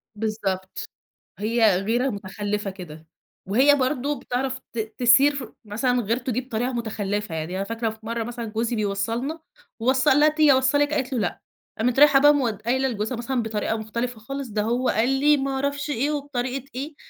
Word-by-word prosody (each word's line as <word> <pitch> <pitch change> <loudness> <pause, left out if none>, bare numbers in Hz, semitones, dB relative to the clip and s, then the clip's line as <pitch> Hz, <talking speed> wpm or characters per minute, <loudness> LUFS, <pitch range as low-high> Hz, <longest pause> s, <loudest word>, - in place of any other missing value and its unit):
بالضبط، 205 -3 -3 0.5
هي 220 -3 +3
غيرة 240 +6 +1
متخلّفة 205 0 -3
كده. 160 -4 -11 0.4
وهي 260 +9 +5
برضه 275 +1 -1
بتعرف 260 +2 -2
ت 235 - -3 0.2
تثير 265 +4 +5
ف 270 -3 -6
مثلًا 245 +4 0
غيرته 240 +4 -1
دي 250 - 0
بطريقة 245 0 -3
متخلّفة. 210 -5 -3
يعني 160 +3 -4
أنا 195 - -1
فاكرة 225 +2 -2
في 220 0 -9
مرّة 230 0 -2
مثلًا 235 0 -5
جوزي 225 +2 -2
بيوصّلنا. 225 +8 -2 0.4
ووصّل 260 +3 +3
قال 270 - +5
لها: 300 +1 +6
"تيجي 305 -2 +4
اوصّلِك؟" 285 +3 +3
قالت 265 -2 -1
له: 250 - 0
"لأ." 195 -5 -2 0.4
قامت 245 +3 +1
رايحة 290 -2 +7
بقى 290 +2 +7
مود 235 -8 -1
قايله 260 +3 +1
لجوزها 225 +1 -3
مثلًا 240 +1 -1
بطريقة 220 0 -2
مختلفة 235 +2 -4
خالص، 275 +4 -5
ده 210 0 -1
هو 240 +4 0
قال 230 +4 +2
لي 290 +2 +4
ما 270 0 -2
أعرفش 280 +2 -2
إيه، 285 +1 0
وبطريقة 275 -3 -3
إيه. 285 +4 -5
240 Hz, 180 wpm, -24 LUFS, 215-270 Hz, 0.5 s, رايحة